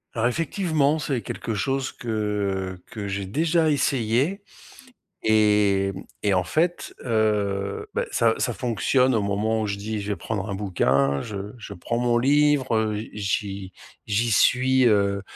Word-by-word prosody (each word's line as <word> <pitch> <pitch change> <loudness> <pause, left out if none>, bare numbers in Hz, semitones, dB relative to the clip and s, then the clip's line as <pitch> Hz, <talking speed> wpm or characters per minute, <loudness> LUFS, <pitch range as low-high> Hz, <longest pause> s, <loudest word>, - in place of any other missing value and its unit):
Alors 115 0 +2
effectivement, 160 - 0
c'est 135 -5 -2
quelque 115 - -4
chose 135 +4 -1
que, 125 - -12 0.7
heu, 90 - -25
que 105 -3 -6
j'ai 100 0 -3
déjà 160 - +1
essayé 140 - +1 0.8
et 105 -3 +3
mmh, 95 - -7 0.2
et 100 - +3
en 90 -1 +2
fait, 170 - -1
heu, 100 -3 0
bah, - - 0
ça 115 -1 +2
ça 120 - -1
fonctionne 125 +2 +1
au 110 - +1
moment 105 +2 0
où - - -1
je 100 -1 -3
dis: 105 +1 -4
«Je 100 - -7
vais - - -2
prendre 105 -2 -4
un - - -2
bouquin». 70 -8 +1
Je 100 0 -6
je 110 - -9
prends 115 +7 -3
mon 120 -1 +2
livre, 145 -1 +3
heu, 110 -1 0 0.2
j'y 100 -1 -3 0.3
j'y 110 +2 0
suis, 130 +4 +4
heu, 100 -2 +2
110 Hz, 160 wpm, -24 LUFS, 100-130 Hz, 0.8 s, suis